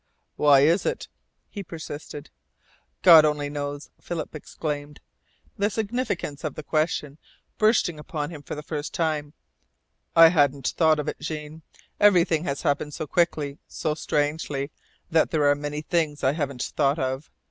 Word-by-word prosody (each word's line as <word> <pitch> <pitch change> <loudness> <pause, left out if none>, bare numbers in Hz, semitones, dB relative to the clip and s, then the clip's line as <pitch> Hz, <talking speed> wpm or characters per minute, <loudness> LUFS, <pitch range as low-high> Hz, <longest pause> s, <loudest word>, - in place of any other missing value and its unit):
"Why 145 -2 +5
is 165 +7 +4
it?" - - -3 0.4
he 205 - -7
persisted. 160 -4 -8 0.7
"God 165 -4 +9
only 150 -1 0
knows," 145 0 -5 0.4
exclaimed 150 -1 -5
Philip, - - -38
the 205 +1 +2
significance 215 - -3
of 155 -3 -3
the 155 - -7
question 155 -1 -1 0.4
bursting 215 -7 +2
upon 150 +1 -4
him 155 -3 -8
for - - -6
the 150 - -7
first 150 -1 -5
time. 155 -3 -1 0.8
"I 165 0 +9
hadn't 145 -5 +2
thought 160 -2 +4
of 150 0 -3
it, - - -4
Jean. 155 0 -6 0.4
Everything 175 -5 +4
has 140 -1 -3
happened 150 -1 -1
so 155 - -4
quickly, 150 -3 0
so 155 -2 -2
strangely, 150 -2 -2 0.4
that 160 -1 +3
there 150 -3 +1
are 145 - +6
many 145 +1 -5
things 155 -3 -1
I 130 - +4
haven't 140 -5 -3
thought 140 0 +1
of. 130 0 -3
150 Hz, 150 wpm, -25 LUFS, 145-165 Hz, 0.8 s, God